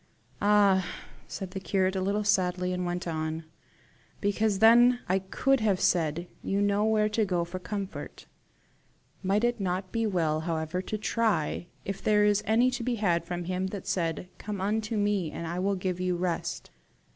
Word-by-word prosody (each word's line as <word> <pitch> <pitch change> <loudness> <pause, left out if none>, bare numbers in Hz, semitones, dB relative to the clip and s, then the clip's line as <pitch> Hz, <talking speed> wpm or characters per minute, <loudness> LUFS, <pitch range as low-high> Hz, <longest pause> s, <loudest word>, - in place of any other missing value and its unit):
"Ah!" 200 -2 +4 0.4
said 190 -2 -6
the 195 - -4
curate 190 0 0
a 190 - 0
little 200 +3 0
sadly, 180 -3 +1
and 180 0 -2
went 175 +1 -3
on. 160 0 -3 0.8
"Because 205 0 +1
then 240 +3 +6
I 190 +2 +2
could 270 +8 +1
have 205 -4 +1
said, 170 0 +1
you 195 - -1
know 205 0 +2
where 215 -1 +3
to 215 +1 +1
go 180 -4 0
for 180 +2 -6
comfort. 200 +1 -6 1.0
Might 200 +3 +1
it 240 -1 +1
not 185 -1 -2
be 230 -1 0
well 165 -6 +1
however 160 +1 -2
to 215 +3 -4
try 215 -7 0 0.2
if 195 0 -4
there 210 -1 +3
is 210 0 +3
any 235 +4 +4
to 250 -1 -3
be 240 +1 -1
had 175 -6 +1
from 175 0 -4
him 185 +2 -2
that 190 0 -6
said 170 -1 -1
'COME 205 -2 -5
UNTO 215 +3 -1
ME, 205 -6 0
AND 170 - -5
I 170 +2 -3
WILL 195 +2 +1
GIVE 185 -1 -2
YOU 180 -1 0
REST? 175 -1 -3
190 Hz, 180 wpm, -28 LUFS, 180-210 Hz, 1.0 s, then